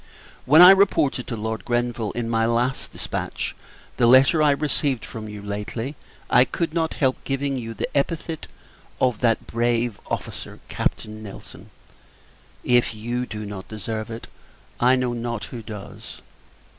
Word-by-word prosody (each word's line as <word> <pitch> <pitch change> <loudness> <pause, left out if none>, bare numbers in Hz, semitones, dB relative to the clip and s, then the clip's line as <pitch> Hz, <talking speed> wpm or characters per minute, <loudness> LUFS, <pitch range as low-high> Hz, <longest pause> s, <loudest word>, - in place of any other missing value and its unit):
When 155 +6 +9
I 180 - +12
reported 190 -10 +3
to 115 - -3
Lord 110 +1 -3
Grenville, 120 -2 -1
in 120 -1 -2
my 115 -1 +2
last 120 +3 0
dispatch, - - -4 0.4
the 120 - +4
letter 135 +6 +6
I 150 - +5
received 140 -3 0
from 110 -2 -7
you 105 -1 -8
lately, 105 +6 -4 0.3
I 125 - +6
could 165 +4 -2
not 165 -1 0
help 130 -3 0
giving 135 0 -1
you 115 -1 -6
the - - -2
epithet 160 +2 -1 0.5
of 125 -4 +2
"that 115 -2 +2
brave 120 -1 0
officer, - - -5
Captain 110 0 -3
Nelson." 105 -3 -11 0.9
If 120 -2 +3
you 120 +3 -3
do 105 0 -6
not 100 -2 -7
deserve 110 +1 -5
it, 115 0 -7 0.5
I 125 +2 +5
know 125 -1 0
not 120 -2 -3
who 120 - -8
does. 105 -2 -9
120 Hz, 150 wpm, -23 LUFS, 110-135 Hz, 0.9 s, I